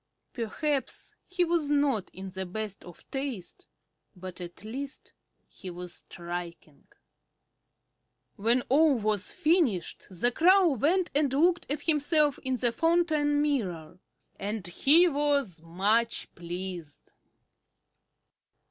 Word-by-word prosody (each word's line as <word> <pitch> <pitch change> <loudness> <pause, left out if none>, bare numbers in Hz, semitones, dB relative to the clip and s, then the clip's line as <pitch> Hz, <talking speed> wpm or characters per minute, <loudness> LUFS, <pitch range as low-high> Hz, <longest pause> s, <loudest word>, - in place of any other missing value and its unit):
Perhaps 270 +5 -2
he 370 -1 +1
was 335 -3 0
not 285 -8 +1
in 190 0 -8
the 190 0 -4
best 210 +1 -5
of 175 - -14
taste, 265 -9 -5 0.5
but 185 0 -9
at 175 +2 -9
least 270 +6 -7 0.3
he 190 - -10
was 175 0 -3
striking. 170 -4 -7 1.5
When 235 +4 +2
all 295 +2 +4
was 215 -3 -1
finished 300 - +1
the 205 +6 +1
Crow 365 +6 +5
went 325 - +1
and 285 -2 +2
looked 340 +6 +2
at 290 +1 -1
himself 300 -2 +2
in 260 0 -1
the 245 -1 +1
fountain 310 -2 +2
mirror; 180 - -2 0.4
and 205 0 -3
he 295 - +5
was 280 - 0
much 205 +8 0
pleased. 175 -3 -7
245 Hz, 110 wpm, -28 LUFS, 185-295 Hz, 1.5 s, Crow